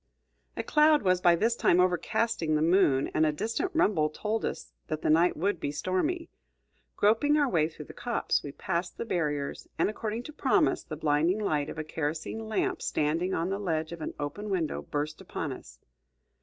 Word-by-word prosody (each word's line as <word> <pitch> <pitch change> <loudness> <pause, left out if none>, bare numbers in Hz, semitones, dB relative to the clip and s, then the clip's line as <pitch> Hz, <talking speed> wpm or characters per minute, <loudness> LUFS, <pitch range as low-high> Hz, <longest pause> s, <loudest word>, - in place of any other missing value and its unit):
A - - -1
cloud 300 -2 +4
was 185 -1 +2
by 175 -1 +6
this 225 +7 +1
time 180 - +3
overcasting 180 -1 +1
the 150 - +2
moon, 160 -6 +3
and 155 - +3
a 155 - +3
distant 230 - -2
rumble 180 - +3
told 215 +8 -2
us - - -5
that 155 0 -4
the - - +3
night 170 +3 +4
would 195 +1 0
be 145 - -2
stormy. 300 - -1 0.7
Groping 230 +9 +3
our 290 -2 +3
way 160 -8 +2
through 155 -2 -10
the - - -11
copse, 240 -1 -1
we 145 - -7
passed 170 +5 -3
the - - -3
barriers, 150 -8 -2
and, 180 - +2
according 220 +2 -4
to 305 - -9
promise, 295 +2 +2
the 155 - -7
blinding 155 +5 +2
light 155 -8 0
of - - -7
a 155 - -2
kerosene 160 +8 -4
lamp 215 - -1
standing 165 +5 0
on 165 +2 -1
the 195 +1 -2
ledge 160 -5 -2
of 170 -1 -7
an - - -5
open 175 +9 -4
window 175 -6 -1
burst 150 +1 -4
upon - - -4
us. - - -12
175 Hz, 195 wpm, -29 LUFS, 155-215 Hz, 0.7 s, by